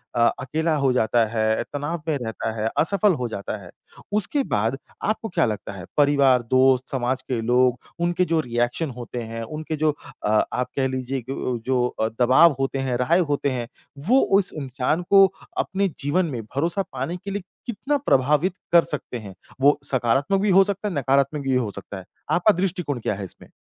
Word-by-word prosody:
अ, 115 Hz, -1 st, +5 dB
अकेला 160 Hz, +4 st, -1 dB
हो 140 Hz, -3 st, +2 dB
जाता 115 Hz, -1 st, +2 dB
है, 110 Hz, 0 st, 0 dB
तनाव 145 Hz, +3 st, -3 dB
में 155 Hz, -3 st, +1 dB
रहता 110 Hz, -3 st, -4 dB
है, 110 Hz, -, +1 dB
असफल 200 Hz, +4 st, +3 dB
हो 125 Hz, -, 0 dB
जाता 100 Hz, 0 st, -5 dB
है। 95 Hz, -4 st, -12 dB, 0.4 s
उसके 215 Hz, +8 st, +2 dB
बाद 110 Hz, +5 st, +1 dB, 0.3 s
आपको 220 Hz, +1 st, -1 dB
क्या 175 Hz, -, +2 dB
लगता 105 Hz, -2 st, -4 dB
है, 95 Hz, -3 st, -8 dB
परिवार, 140 Hz, -3 st, +4 dB
दोस्त, 130 Hz, 0 st, +4 dB
समाज 130 Hz, 0 st, -1 dB
के 125 Hz, -3 st, -3 dB
लोग 125 Hz, +1 st, +2 dB, 0.2 s
उनके 175 Hz, +1 st, +1 dB
जो 165 Hz, -1 st, +1 dB
रिएक्शन 120 Hz, +3 st, -1 dB
होते 120 Hz, 0 st, -5 dB
हैं, 115 Hz, 0 st, -6 dB
उनके 155 Hz, +6 st, -5 dB
जो 155 Hz, -, +4 dB, 0.3 s
अ, 105 Hz, 0 st, +3 dB
आप 125 Hz, 0 st, -1 dB
कह 135 Hz, -1 st, +1 dB
लीजिए 130 Hz, 0 st, -3 dB
कि -, -, -1 dB, 0.3 s
जो 130 Hz, -2 st, +2 dB
अ, 110 Hz, -, -2 dB
दबाव 130 Hz, +6 st, +6 dB
होते 135 Hz, 0 st, -1 dB
हैं, 130 Hz, -2 st, -1 dB
राहे 125 Hz, +8 st, +3 dB
होते 140 Hz, 0 st, +1 dB
हैं, 120 Hz, -2 st, -3 dB, 0.4 s
वो 255 Hz, +4 st, +5 dB, 0.2 s
उस 195 Hz, -, -2 dB
इंसान 140 Hz, +3 st, -1 dB
को 195 Hz, -1 st, +8 dB, 0.3 s
अपने 200 Hz, -, 0 dB
जीवन 160 Hz, +6 st, +1 dB
में 130 Hz, -8 st, -4 dB
भरोसा 165 Hz, -, -1 dB
पाने 135 Hz, +7 st, -3 dB
के 200 Hz, +3 st, -7 dB
लिए 200 Hz, +1 st, -3 dB, 0.2 s
कितना 260 Hz, +5 st, -1 dB
प्रभावित 150 Hz, +7 st, +3 dB, 0.2 s
कर 170 Hz, 0 st, +7 dB
सकते 140 Hz, -4 st, -5 dB
हैं? 105 Hz, -4 st, -9 dB, 0.3 s
वो 145 Hz, +2 st, +5 dB
सकारात्मक 135 Hz, +9 st, +1 dB
भी 210 Hz, -, +1 dB
हो 195 Hz, +1 st, +7 dB
सकता 200 Hz, +1 st, -2 dB
है, 200 Hz, -, -3 dB
नकारात्मक 140 Hz, +2 st, +1 dB
भी 135 Hz, -1 st, +1 dB
हो 125 Hz, -4 st, 0 dB
सकता 100 Hz, 0 st, -8 dB
है। 95 Hz, -, -10 dB, 0.3 s
आपका 180 Hz, +5 st, +4 dB
दृष्टिकोण 180 Hz, -7 st, -1 dB
क्या 110 Hz, -, -1 dB
है 100 Hz, -, -6 dB
इसमें? 95 Hz, -, -11 dB
135 Hz, 195 wpm, -23 LUFS, 120-170 Hz, 0.4 s, को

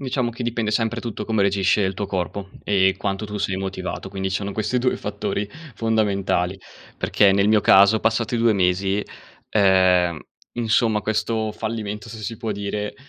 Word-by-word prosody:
Diciamo 130 Hz, -2 st, -1 dB
che 120 Hz, +2 st, -7 dB
dipende 115 Hz, -2 st, -1 dB
sempre 115 Hz, +2 st, 0 dB
tutto 110 Hz, -3 st, -5 dB
come 110 Hz, -3 st, +1 dB
reagisce 100 Hz, +1 st, +2 dB
il 95 Hz, 0 st, 0 dB
tuo 100 Hz, +2 st, -3 dB
corpo, 95 Hz, +1 st, -3 dB, 0.2 s
ehm, 95 Hz, -2 st, +3 dB
quanto 100 Hz, +2 st, -3 dB
tu 105 Hz, 0 st, -6 dB
sei 100 Hz, -2 st, -1 dB
motivato, 95 Hz, 0 st, -5 dB
quindi 95 Hz, 0 st, -3 dB
sono 100 Hz, +1 st, -2 dB
questi 110 Hz, +4 st, -1 dB
2 125 Hz, +1 st, +1 dB
i -, -, -5 dB
fattori 105 Hz, 0 st, -3 dB, 0.3 s
fondamentali. 100 Hz, -5 st, 0 dB, 0.4 s
Perché 100 Hz, -1 st, +3 dB
nel 100 Hz, +1 st, +3 dB
mio 110 Hz, -1 st, +4 dB
caso 100 Hz, +3 st, +6 dB
passati 115 Hz, +1 st, 0 dB
2 115 Hz, -1 st, +3 dB
mesi, 95 Hz, +2 st, +1 dB, 0.5 s
ehm, 95 Hz, -4 st, +4 dB, 0.3 s
insomma 110 Hz, -2 st, +1 dB
questo 110 Hz, +1 st, -1 dB
fallimento, 110 Hz, -1 st, -5 dB
se 115 Hz, -, -8 dB
si 110 Hz, +2 st, -5 dB
può 115 Hz, -2 st, -3 dB
dire, 105 Hz, 0 st, -3 dB
105 Hz, 170 wpm, -22 LUFS, 95-110 Hz, 0.5 s, caso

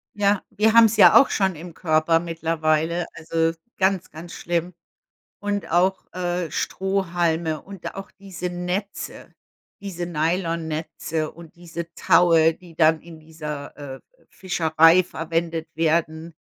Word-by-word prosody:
Ja, 205 Hz, -1 st, +2 dB
wir 215 Hz, +2 st, +2 dB
haben 230 Hz, -1 st, +8 dB
es 220 Hz, 0 st, +1 dB
ja 210 Hz, -, +8 dB
auch 275 Hz, -, +4 dB
schon 190 Hz, -4 st, 0 dB
im 170 Hz, +2 st, -10 dB
Körper 165 Hz, -1 st, +2 dB
mittlerweile, 165 Hz, 0 st, -1 dB
also, 165 Hz, 0 st, -1 dB, 0.2 s
ganz, 190 Hz, -1 st, 0 dB
ganz 165 Hz, +3 st, -10 dB
schlimm. 175 Hz, +1 st, -2 dB, 0.7 s
Und 205 Hz, -1 st, -3 dB
auch, 185 Hz, +2 st, +1 dB
äh, 175 Hz, -2 st, -2 dB
Strohhalme 170 Hz, -5 st, -1 dB
und 195 Hz, -2 st, -8 dB
auch 195 Hz, -, -8 dB
diese 185 Hz, -3 st, -7 dB
Netze, 180 Hz, +3 st, -5 dB, 0.5 s
diese 180 Hz, -3 st, -5 dB
Nylonnetze 160 Hz, -1 st, -2 dB
und 170 Hz, -1 st, -14 dB
diese 170 Hz, -1 st, -8 dB
Taue, 165 Hz, -2 st, +4 dB
die 175 Hz, -3 st, -16 dB
dann 160 Hz, -1 st, +4 dB
in 165 Hz, -1 st, -13 dB
dieser, 150 Hz, -2 st, -8 dB
äh, 140 Hz, -2 st, -8 dB
äh, -, -, -17 dB, 0.3 s
Fischerei 165 Hz, -1 st, +3 dB
verwendet 165 Hz, -1 st, -3 dB
werden, 160 Hz, 0 st, -1 dB
170 Hz, 130 wpm, -23 LUFS, 160-180 Hz, 0.7 s, haben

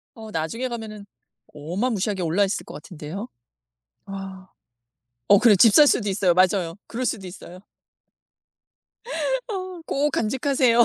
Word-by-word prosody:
어 220 Hz, -2 st, -10 dB
나중에 205 Hz, +9 st, -3 dB
가면은 220 Hz, -4 st, -7 dB, 0.5 s
어마 175 Hz, -, -2 dB
무시하게 205 Hz, -3 st, -1 dB
올라있을 190 Hz, +5 st, 0 dB
것 -, -, -10 dB
같은데요. 180 Hz, +6 st, -8 dB, 0.8 s
아. 195 Hz, -1 st, -8 dB, 0.8 s
어 205 Hz, -, +7 dB
그래 230 Hz, -4 st, +6 dB
집 210 Hz, +3 st, +6 dB
살 295 Hz, +5 st, +8 dB
수도 210 Hz, -6 st, +2 dB
있어요. 190 Hz, -2 st, +2 dB
맞아요. 185 Hz, -2 st, +2 dB
그럴 250 Hz, +2 st, -3 dB
수도 210 Hz, -6 st, -2 dB
있어요. 180 Hz, 0 st, -11 dB, 1.9 s
어 370 Hz, -4 st, -5 dB
꼭 290 Hz, +2 st, 0 dB
간직하세요. 250 Hz, 0 st, +3 dB
205 Hz, 275 characters per minute, -23 LUFS, 185-240 Hz, 1.9 s, 살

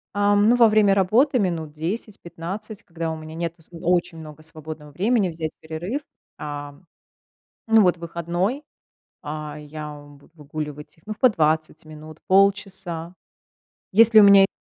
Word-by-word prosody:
Эм, 205 Hz, 0 st, +3 dB
ну, 245 Hz, -, +5 dB
во 235 Hz, -2 st, +6 dB
время 210 Hz, -2 st, +4 dB
работы 230 Hz, +8 st, +3 dB
минут 165 Hz, -6 st, -2 dB
10-15, 190 Hz, +3 st, -6 dB
когда 165 Hz, -1 st, -5 dB
у -, -, -4 dB
меня 155 Hz, 0 st, -10 dB
нету 170 Hz, 0 st, -5 dB
св 165 Hz, -, -23 dB
очень 175 Hz, -1 st, 0 dB
много 155 Hz, 0 st, -11 dB
свободного 155 Hz, -1 st, -7 dB
времени, 200 Hz, -, +1 dB
взять 160 Hz, -1 st, -5 dB
перерыв. 170 Hz, -, -5 dB, 0.4 s
Ам, 145 Hz, +2 st, -8 dB, 0.8 s
ну, 225 Hz, -1 st, +6 dB
вот 180 Hz, -1 st, +3 dB
выходной, 170 Hz, -, -3 dB, 0.6 s
а, 150 Hz, 0 st, -6 dB
я 150 Hz, 0 st, -8 dB
в 145 Hz, 0 st, -15 dB
буду 145 Hz, -, -23 dB
выгуливать 150 Hz, 0 st, -7 dB
их, 160 Hz, -, -27 dB
ну, 215 Hz, -, -4 dB
по 255 Hz, -, +6 dB
20 155 Hz, -5 st, 0 dB
минут, 155 Hz, 0 st, -12 dB
полчаса. 190 Hz, -3 st, +1 dB, 0.8 s
Если 220 Hz, +1 st, +7 dB
у -, -, +8 dB
меня 200 Hz, -1 st, +8 dB
170 Hz, 150 wpm, -23 LUFS, 155-200 Hz, 0.8 s, у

